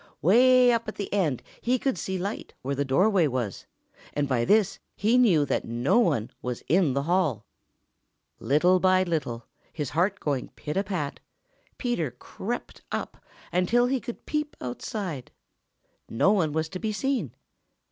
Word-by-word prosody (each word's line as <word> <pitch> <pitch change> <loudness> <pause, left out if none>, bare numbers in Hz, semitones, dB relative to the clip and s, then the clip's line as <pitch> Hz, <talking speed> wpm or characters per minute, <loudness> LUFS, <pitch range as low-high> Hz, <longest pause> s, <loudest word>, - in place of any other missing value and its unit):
Way 250 - +6
up 230 -1 0
at 215 - -5
the 200 - -5
end 160 - 0 0.2
he 250 +2 +2
could 265 +1 0
see 190 0 -3
light 200 +4 -5
where 135 +2 -1
the 140 +1 0
doorway 180 +6 +3
was, 120 -7 -3 0.5
and 145 -1 0
by 120 -3 +1
this 210 - +3 0.2
he 220 +5 +2
knew 195 -13 +5
that - - -1
no 120 - +1
one 145 - +1
was 125 -1 -4
in 165 -2 +3
the 140 - 0
hall. 160 - +1 0.9
Little 165 +9 +3
by 185 0 +4
little, 150 -10 -3 0.3
his 150 -5 -4
heart 185 +6 +1
going 140 -4 -2
pit 150 - -5
a 195 - +2
pat, 180 -8 -3 0.6
Peter 240 - -1
crept 195 - -6
up - - -5 0.3
until 190 +8 +3
he 260 +1 +1
could 235 +1 -8
peep 300 -1 -2
outside. 140 - -5 0.8
No 150 - +3
one 180 -7 +2
was 160 +1 -1
to 185 - -6
be 220 +1 -2
seen. 220 - -2
180 Hz, 160 wpm, -26 LUFS, 140-215 Hz, 0.9 s, Way